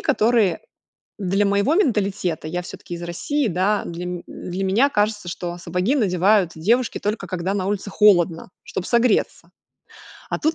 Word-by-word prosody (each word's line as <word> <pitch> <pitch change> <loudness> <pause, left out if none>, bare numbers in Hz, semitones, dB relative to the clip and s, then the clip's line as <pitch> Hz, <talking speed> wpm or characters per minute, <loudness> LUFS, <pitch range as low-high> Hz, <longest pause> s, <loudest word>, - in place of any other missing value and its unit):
которые 230 -7 +2 0.6
для 195 +1 +1
моего 200 +9 +2
менталитета- 200 - 0
я 175 +3 -3
всё-таки 175 0 -8
из 170 - -7
России, 255 - -1
да, 200 +3 +1
для 170 +1 -5
ме 180 -1 -5
для 185 +2 -6
меня 210 +9 +3
кажется, 210 -5 0
что 175 0 -5
сапоги 180 - 0
надевают 195 - +3
девушки 230 +9 +1
только 210 -2 -3
когда 185 +2 -2
на 190 -2 -1
улице 200 0 -3
холодно, 180 -5 +3
чтоб 180 - -5
согреться. 235 -1 +1 0.8
А - - -1
тут- 315 +1 +1
195 Hz, 155 wpm, -22 LUFS, 180-215 Hz, 0.8 s, меня